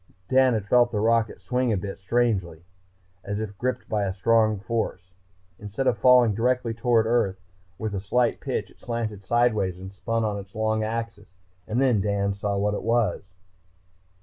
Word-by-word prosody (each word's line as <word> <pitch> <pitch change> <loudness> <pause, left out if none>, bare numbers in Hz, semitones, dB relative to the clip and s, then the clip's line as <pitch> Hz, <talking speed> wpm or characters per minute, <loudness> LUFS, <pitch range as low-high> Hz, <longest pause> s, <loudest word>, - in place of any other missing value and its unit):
Dan 130 -2 +4
had 105 -3 -2
felt 120 +2 +4
the 105 - -1
rocket 115 0 +1
swing 125 -1 0
a 105 - +1
bit, 95 +1 -6
strangely, 95 -6 0 0.6
as 100 +1 -3
if 105 -2 -5
gripped 125 0 -2
by 105 -2 0
a 95 - -2
strong 110 +1 +3
force. 95 -3 -3 0.5
Instead 105 +5 -4
of 125 - +3
falling 125 0 +5
directly 120 +1 0
down 115 - -17
toward 120 -2 +3
Earth 110 -5 +1 0.4
with 110 -2 -4
a 100 - -2
slight 120 +5 +1
pitch, - - -3
it - - -23
slanted 110 -4 -4
sideways 110 -4 +1
and 95 +1 -9
spun 115 +3 -2
on 105 -1 -2
its 100 0 -12
long 110 0 0
axis. 110 -3 -5 0.3
And 110 +3 -1
then 125 -6 +3
Dan 100 0 0
saw 100 0 -2
what 105 +1 0
it - - -3
was.... 115 -5 +1
110 Hz, 180 wpm, -25 LUFS, 100-120 Hz, 0.6 s, falling